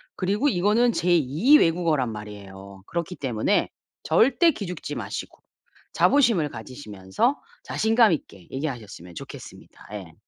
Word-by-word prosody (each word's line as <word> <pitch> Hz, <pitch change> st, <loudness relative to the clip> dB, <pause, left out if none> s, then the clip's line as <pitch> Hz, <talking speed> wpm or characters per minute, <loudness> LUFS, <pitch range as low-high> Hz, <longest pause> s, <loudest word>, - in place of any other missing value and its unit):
그리고 205 Hz, +9 st, +1 dB
이거는 215 Hz, +4 st, +2 dB
제 180 Hz, -2 st, 0 dB
2 165 Hz, -, +4 dB
외국어란 160 Hz, -7 st, +1 dB
말이에요. 100 Hz, -2 st, -10 dB
그렇기 170 Hz, +1 st, -4 dB
때문에 120 Hz, -6 st, 0 dB, 0.3 s
절대 265 Hz, -, +4 dB
기죽지 180 Hz, -, -6 dB
마시고 115 Hz, -6 st, -6 dB, 0.5 s
자부심을 185 Hz, -, +3 dB
가지시면서 110 Hz, -, -3 dB, 0.3 s
자신감 225 Hz, -3 st, +3 dB
있게 95 Hz, -, -7 dB
얘기하셨으면 120 Hz, -, -6 dB
좋겠습니다. -, -, -11 dB
예. 95 Hz, -6 st, -8 dB
155 Hz, 320 characters per minute, -24 LUFS, -, 0.5 s, 2